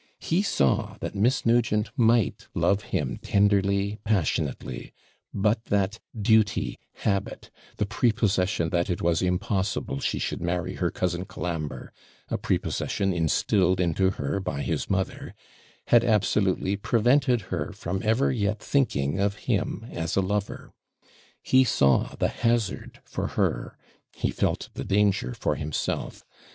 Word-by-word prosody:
He 170 +4 0
saw 70 - +1
that - - -4
Miss 115 +7 +1
Nugent 115 -2 +2
might 115 -2 +2
love 100 +2 +1
him - - -2
tenderly, 100 0 +2
passionately; 90 - -1 0.4
but 110 +3 0
that 100 +1 0 0.2
duty, 110 0 +2 0.2
habit, 100 -2 -2 0.3
the 105 - +1
prepossession 100 -6 +1
that 85 +2 0
it 90 +2 -2
was 85 0 +2
impossible 95 -3 -1
she - - -1
could - - -3
marry 85 0 -1
her - - +1
cousin 90 0 -2
Colambre 80 -5 -5 0.4
a - - -2
prepossession 95 -1 -1
instilled 90 +3 +2
into 90 +2 +2
her 95 0 -2
by 90 -7 -3
his - - -2
mother 95 -1 -2 0.5
had 120 -1 +6
absolutely 100 -3 +2
prevented 120 +4 +2
her - - -2
from 95 +2 -4
ever 115 +5 +2
yet 105 -3 0
thinking 95 - 0
of 100 0 +1
him 110 -1 -1
as 80 -1 -3
a 95 - +3
lover. 100 +2 -3 0.7
He 130 0 +5
saw 70 - +2
the - - +1
hazard 115 -4 -1
for - - -3
her, - - -1 0.4
he - - -1
felt - - -1
the - - -5
danger 105 +5 +1
for 105 - 0
himself. 75 +1 -3
100 Hz, 135 wpm, -26 LUFS, 90-110 Hz, 0.7 s, had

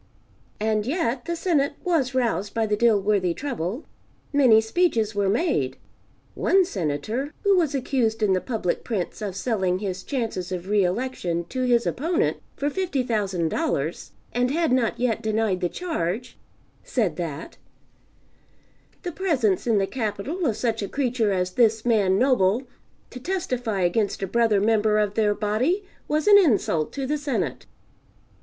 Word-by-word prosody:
And 215 0 0
yet 260 -5 -1
the 340 0 -2
Senate 320 -5 +1
was 290 -8 0
roused 215 -6 0
by 225 -1 +2
the 210 -1 +1
Dilworthy 205 -5 +2
trouble. 245 - -4 0.5
Many 255 -6 +6
speeches 225 -3 +1
were 200 -1 +1
made. 205 - 0 0.6
One 385 -1 +3
Senator 215 - -3
(who 400 -1 +4
was 320 -6 +1
accused 240 -4 0
in 200 -2 +3
the 185 - +1
public 220 -8 -2
prints 210 -3 -3
of 200 -3 -4
selling 190 -5 0
his 190 -2 -4
chances 225 -8 -3
of 180 +1 -5
re 205 -1 +3
election 180 -4 -2
to 255 -1 -1
his 240 -1 +3
opponent 330 +6 0 0.2
for 285 - -2
$50,000 210 - -1 0.2
and 245 +1 +1
had 325 +1 +1
not 250 -3 +1
yet 240 -3 0
denied 215 -3 0
the 175 - 0
charge) 245 - -3 0.5
said 210 -11 0
that, 165 -3 -5 1.5
"the 355 - -3
presence 270 - 0
in 225 -3 +3
the 195 - +2
Capital 250 - -3
of 220 -3 -1
such 225 -2 -1
a 200 - -3
creature 250 -6 0
as 185 -1 0
this 220 +1 +2
man 205 -5 +3
Noble, 245 -2 +3 0.5
to 250 - -8
testify 250 - -2
against 195 +3 0
a - - +2
brother 225 0 +2
member 215 0 +2
of 210 -1 +1
their 210 -1 +2
body, 240 - 0 0.2
was 305 +1 0
an 405 -1 +9
insult 210 - +2
to 275 -1 -3
the 300 +3 -1
Senate." 280 -4 -3
225 Hz, 150 wpm, -24 LUFS, 195-265 Hz, 1.5 s, an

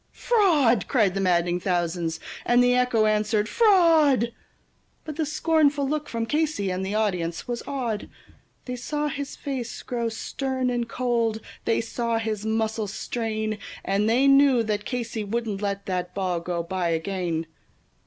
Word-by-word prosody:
"Fraud!" 310 - +3
cried 215 -8 +2
the 195 - -1
maddened 175 -1 +1
thousands, 175 -2 -1 0.2
and 245 +1 +4
the 245 0 +4
echo 250 -3 +3
answered, 215 0 +1
"Fraud!" 320 - +4 0.7
But 310 -2 -6
the 310 -1 -1
scornful 300 -2 +2
look 300 +1 -2
from 230 -1 -2
Casey, 295 -8 0
and 185 +1 -2
the 195 +2 -2
audience 180 -6 -1
was 240 -1 -3
awed; 240 -6 -3 0.6
They 250 - -4
saw 295 +4 -2
his 285 0 -5
face 260 -5 -5
grow 235 -2 -2
stern 260 +3 -2
and 240 -1 -2
cold, 235 -3 0 0.3
they 230 - +2
saw 230 0 -2
his 220 -2 -3
muscles 220 -1 -1
strain, 220 -2 -3 0.3
And 200 +2 +1
they 255 +4 +4
knew 275 -3 +5
that 210 -1 -2
Casey 235 -3 -3
wouldn't 210 -1 -3
let 200 -1 -2
that 180 -1 -3
ball 185 -3 -1
go 170 0 -3
by 175 0 -2
again. 165 -1 -2
225 Hz, 155 wpm, -25 LUFS, 195-260 Hz, 0.7 s, knew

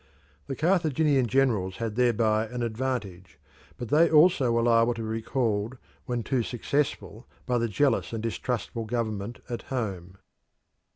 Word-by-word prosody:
The 135 - -3
Carthaginian 155 -5 +2
generals 110 -7 +1
had 115 -1 -4
thereby 115 -2 +2
an 120 +2 -4
advantage, 110 - -4 0.4
but 120 -3 -6
they 160 +5 +5
also 155 -5 +5
were 115 0 +2
liable 115 0 +3
to 115 - -5
be - - -4
recalled 115 0 -1 0.3
when 120 -2 -2
too 130 0 0
successful 130 -1 -2 0.2
by 125 -2 +1
the 115 - 0
jealous 115 +5 +1
and 115 -1 -4
distrustful 115 -1 -3
government 110 -1 -3
at 120 - -4
home. 95 -8 -4
120 Hz, 140 wpm, -27 LUFS, 110-130 Hz, 0.4 s, they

